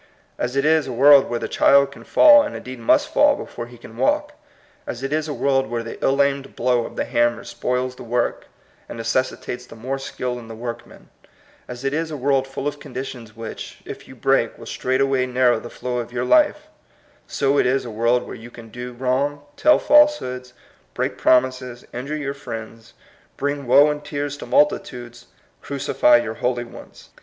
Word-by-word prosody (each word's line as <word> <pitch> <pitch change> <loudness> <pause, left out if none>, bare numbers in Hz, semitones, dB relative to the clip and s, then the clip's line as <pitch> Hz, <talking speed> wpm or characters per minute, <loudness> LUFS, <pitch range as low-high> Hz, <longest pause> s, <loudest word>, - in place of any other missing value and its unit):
As 125 +2 -2
it 140 +1 +1
is 160 -1 +3
a - - -4
world 140 +3 +6
where 120 - -1
the - - -4
child 140 0 +4
can - - -13
fall, 295 -2 +7
and 295 - -4
indeed 130 -1 -8
must 115 - +2
fall - - +5
before 120 -1 -7
he 120 0 -14
can 115 -1 -13
walk; 295 - +1 0.5
as 120 +2 -6
it 135 +2 -2
is 155 0 -1
a - - -4
world 135 -4 +1
where 120 0 -3
the 115 - -8
ill 140 +1 +3
aimed 140 -1 -3
blow 120 -1 +1
of - - -13
the - - -2
hammer 120 0 +1
spoils 125 0 -3
the - - -13
work, 120 +1 -2 0.4
and - - -7
necessitates 125 +1 -2
the - - -12
more 130 +4 -4
skill 125 -2 -4
in 115 - -12
the 115 - -9
workman; 120 +1 -8 0.6
as 125 +2 -8
it 135 - 0
is 160 +1 -1
a 150 - -5
world 135 0 +1
full 135 +1 -5
of 145 0 -4
conditions 125 -5 -8
which, 115 -1 -8
if - - -9
you - - -12
break, - - +1
will - - -11
straightway 130 0 0
narrow 125 -2 +2
the 120 - -9
flow 125 0 -4
of 120 0 -6
your 125 0 -2
life, 300 - +3 0.3
— - - -34 0.2
so 140 0 +1
it - - +3
is 135 +1 0
a 120 - -6
world 115 +3 +1
where - - -8
you 115 +2 -10
can 115 -1 -13
do 125 +2 -7
wrong, 135 +4 -1
tell 305 - +5
falsehoods, 130 - +3 0.4
break - - -2
promises, 130 -1 +1
injure 140 +5 -4
your 140 -2 -3
friends, 115 -4 -9 0.4
bring 145 -1 -3
woe 140 +4 +6
and 150 0 -6
tears 145 -1 -4
to 145 - -9
multitudes, 120 -4 0 0.3
crucify 130 -3 +3
your 120 -2 -3
holy 120 -1 0
ones. - - -14
130 Hz, 200 wpm, -21 LUFS, 120-140 Hz, 0.6 s, fall